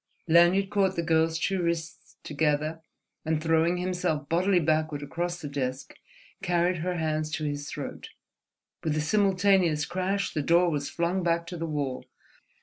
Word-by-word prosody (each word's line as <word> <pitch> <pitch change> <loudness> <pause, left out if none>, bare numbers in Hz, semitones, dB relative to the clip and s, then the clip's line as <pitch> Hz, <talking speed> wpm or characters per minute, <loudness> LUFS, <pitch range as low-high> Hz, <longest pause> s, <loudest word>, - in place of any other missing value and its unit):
Lanyard 175 +4 +4
caught 195 -2 +2
the 170 - -1
girl's 160 0 +2
two 190 +3 -1
wrists 170 -1 -3
together 155 +1 -1 0.4
and, 160 -1 0
throwing 165 +2 +2
himself 180 -5 -2
bodily 180 +2 +2
backward 155 -2 0
across 175 +4 -3
the 155 - -6
desk, 135 -2 -4 0.5
carried 175 -1 +1
her 180 +3 -2
hands 155 -1 -1
to 160 0 -4
his 145 -1 -3
throat. - - -7 0.7
With 155 -1 0
a - - +1
simultaneous 185 -3 +2
crash 190 +3 -2
the 155 - 0
door 170 +3 +3
was 145 -2 -2
flung 175 +3 -1
back 170 -1 0
to 175 - -7
the 165 0 -3
wall. 145 -4 -3
165 Hz, 155 wpm, -27 LUFS, 155-180 Hz, 0.7 s, Lanyard